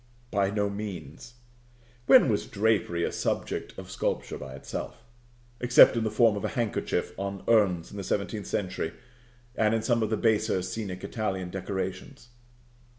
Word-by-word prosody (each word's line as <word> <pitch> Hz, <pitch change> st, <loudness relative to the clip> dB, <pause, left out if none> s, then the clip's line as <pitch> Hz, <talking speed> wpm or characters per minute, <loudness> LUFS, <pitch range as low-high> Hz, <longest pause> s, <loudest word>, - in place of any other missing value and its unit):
By 100 Hz, -1 st, +2 dB
no 105 Hz, 0 st, 0 dB
means. 100 Hz, -, -7 dB, 0.7 s
When 255 Hz, -, +8 dB
was 105 Hz, -4 st, 0 dB
drapery 100 Hz, -5 st, +1 dB
a -, -, 0 dB
subject -, -, -3 dB
of -, -, -8 dB
sculpture -, -, -2 dB
by 65 Hz, 0 st, -8 dB
itself, 70 Hz, +10 st, -7 dB, 0.6 s
except 125 Hz, 0 st, +7 dB
in 115 Hz, -, 0 dB
the 110 Hz, -, 0 dB
form 110 Hz, 0 st, +4 dB
of 100 Hz, -, -4 dB
a -, -, +1 dB
handkerchief 115 Hz, -3 st, -1 dB
on 100 Hz, 0 st, -4 dB
urns 95 Hz, -7 st, +3 dB
in 100 Hz, -, -8 dB
the 100 Hz, -, -4 dB
seventeenth 100 Hz, +2 st, -2 dB
century 90 Hz, -4 st, -2 dB, 0.6 s
and 110 Hz, -2 st, +2 dB
in 110 Hz, -, -1 dB
some 120 Hz, -2 st, +2 dB
of 110 Hz, -, 0 dB
the 110 Hz, -, 0 dB
baser 105 Hz, -5 st, +2 dB
scenic 95 Hz, -1 st, -5 dB
Italian 95 Hz, -5 st, -3 dB
decorations? 95 Hz, +7 st, -5 dB
100 Hz, 155 wpm, -28 LUFS, 95-110 Hz, 0.7 s, When